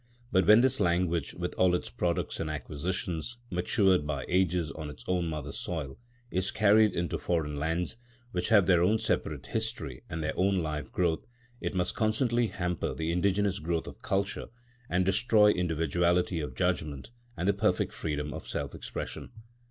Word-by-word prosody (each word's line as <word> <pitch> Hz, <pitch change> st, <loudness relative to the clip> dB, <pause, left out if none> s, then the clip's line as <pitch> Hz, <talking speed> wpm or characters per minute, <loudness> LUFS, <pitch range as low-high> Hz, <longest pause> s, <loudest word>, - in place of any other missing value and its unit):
But 95 Hz, -4 st, +3 dB
when 110 Hz, +2 st, +8 dB
this 130 Hz, +1 st, +3 dB
language, 85 Hz, -1 st, +1 dB
with 90 Hz, 0 st, -3 dB
all 90 Hz, -1 st, +5 dB
its -, -, -4 dB
products -, -, -1 dB
and -, -, -2 dB
acquisitions, 90 Hz, +6 st, -3 dB
matured 90 Hz, -2 st, +2 dB
by 70 Hz, -3 st, -2 dB
ages 90 Hz, -4 st, +1 dB
on 75 Hz, +1 st, -6 dB
its 75 Hz, -, -11 dB
own 90 Hz, -2 st, +1 dB
mother 75 Hz, -3 st, -4 dB
soil, 75 Hz, -5 st, -5 dB, 0.3 s
is 95 Hz, +2 st, +1 dB
carried 110 Hz, 0 st, +4 dB
into 85 Hz, -1 st, -1 dB
foreign 75 Hz, -4 st, -1 dB
lands, 80 Hz, +7 st, -1 dB, 0.3 s
which 90 Hz, -, -1 dB
have 105 Hz, -4 st, +6 dB
their 90 Hz, -2 st, +4 dB
own 105 Hz, +6 st, +4 dB
separate 80 Hz, -, -1 dB
history 110 Hz, -, -3 dB
and 80 Hz, -1 st, -3 dB
their 75 Hz, -, -2 dB
own 95 Hz, +1 st, +2 dB
life 75 Hz, -3 st, -3 dB
growth, 85 Hz, -3 st, 0 dB, 0.3 s
it -, -, -3 dB
must 90 Hz, -1 st, 0 dB
constantly 120 Hz, +2 st, +1 dB
hamper 90 Hz, -3 st, -2 dB
the 80 Hz, +1 st, -1 dB
indigenous 100 Hz, +2 st, +1 dB
growth 85 Hz, 0 st, -1 dB
of -, -, -10 dB
culture 100 Hz, 0 st, -1 dB, 0.4 s
and 90 Hz, +1 st, +2 dB
destroy 105 Hz, +2 st, +5 dB
individuality 85 Hz, +1 st, +1 dB
of 75 Hz, -, -5 dB
judgement 80 Hz, -, -1 dB, 0.3 s
and 90 Hz, -, -1 dB
the 100 Hz, -, +4 dB
perfect 100 Hz, -3 st, +1 dB
freedom 75 Hz, -2 st, -3 dB
of -, -, -7 dB
self 70 Hz, -1 st, -3 dB
expression. -, -, -6 dB
90 Hz, 165 wpm, -29 LUFS, 80-100 Hz, 0.4 s, when